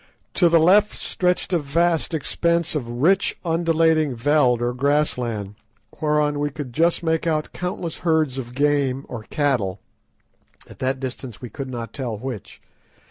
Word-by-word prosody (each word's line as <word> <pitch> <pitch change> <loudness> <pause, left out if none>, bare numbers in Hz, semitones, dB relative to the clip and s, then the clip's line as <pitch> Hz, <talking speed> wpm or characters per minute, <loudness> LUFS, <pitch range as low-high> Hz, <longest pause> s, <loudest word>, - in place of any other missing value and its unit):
To 175 - +4
the 165 - +5
left 195 +6 +4
stretched 180 0 -1
a 175 - +3
vast 165 +3 +1
expanse 170 +2 0
of 135 -7 -3
rich, 195 +4 +3
undulating 165 -3 +2
veld 130 -1 +3
or 120 0 -1
grass 145 +4 +1
land, 110 -5 -4 0.5
whereon 150 -1 +1
we 145 0 0
could 145 -4 -7
just 165 +5 +2
make 160 0 0
out 155 -2 -1
countless 180 -2 -4
herds 155 -6 +1
of 120 -1 -7
game 140 -1 +1
or 120 - -6
cattle, 120 -10 0 0.9
at - - -14
that 130 0 -1
distance 130 -3 -6
we 125 - -8
could 135 -3 -6
not 120 -2 -6
tell 125 -6 -4
which. 125 -2 -7
145 Hz, 155 wpm, -22 LUFS, 125-165 Hz, 0.9 s, the